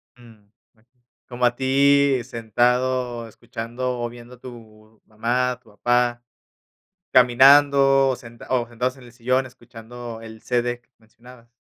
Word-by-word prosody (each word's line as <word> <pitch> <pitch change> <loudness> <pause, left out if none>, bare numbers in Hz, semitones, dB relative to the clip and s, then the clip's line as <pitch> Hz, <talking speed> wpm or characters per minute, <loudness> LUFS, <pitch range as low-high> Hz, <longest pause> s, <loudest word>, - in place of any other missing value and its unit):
Mm, 115 -4 -19 0.3
okey. 120 +2 -35 0.3
Como 125 0 -6
a 120 0 +2
ti, 140 0 +3
sentado, 120 +1 -1
escuchando, 120 +3 -6
o, 120 0 -3
viendo 120 +1 -13
a - - -25
tu 110 -3 -14
mamá, 120 +4 -1
a 125 - -7
tu 120 - -24
papá, 120 +3 0 0.9
caminando, 135 +2 +5
o, 130 - -1
sen 115 0 -14
o, 125 -3 0
sentados 125 +3 -3
en 130 - -15
el 120 - -15
sillón, 130 +2 -1
escuchando 120 -1 -11
el 110 -1 -12
CD 120 0 -2 0.2
mencionabas. 115 +2 -18
120 Hz, 140 wpm, -22 LUFS, 115-125 Hz, 0.9 s, caminando